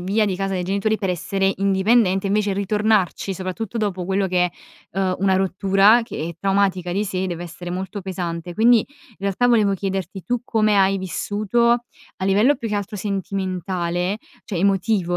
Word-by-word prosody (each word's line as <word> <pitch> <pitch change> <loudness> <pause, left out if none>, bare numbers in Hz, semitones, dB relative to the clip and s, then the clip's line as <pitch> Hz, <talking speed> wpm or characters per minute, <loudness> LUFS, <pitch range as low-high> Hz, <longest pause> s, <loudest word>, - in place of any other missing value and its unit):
via 205 +4 +1
di 185 -2 -1
casa 195 0 -2
dei 180 -1 -1
genitori 200 +3 0
per 195 - -2
essere 195 +2 0
indipendente 195 0 +2
invece 205 0 +1
ritornarci, 200 -1 +1
soprattutto 190 +5 -4
dopo 190 -4 -2
quello 190 +1 0
che, 180 -1 +1 0.4
uhm, 190 -1 0
una 190 -1 +3
rottura, 195 +4 +4
che - - -7
è 170 - -7
traumatica 195 -3 +1
di 200 +3 0
sé, 190 -1 -2
deve 175 -1 -4
essere 175 +1 -8
molto 190 +2 -4
pesante. 175 -2 -4
Quindi, 230 +3 +5
i 280 -4 -15
realtà 200 +5 +1
volevo 215 -4 +4
chiederti: 190 -1 -4
tu 245 0 -1
come 215 -3 +2
hai 195 0 +3
vissuto, 210 +5 0 0.5
a 190 - -4
livello 215 +9 +4
più 230 - -5
che 210 - -2
altro 205 +1 -3
sentimentale, 185 -1 -2 0.3
cioè 195 - -5
emotivo, 195 -1 +1
195 Hz, 170 wpm, -22 LUFS, 185-210 Hz, 0.5 s, Quindi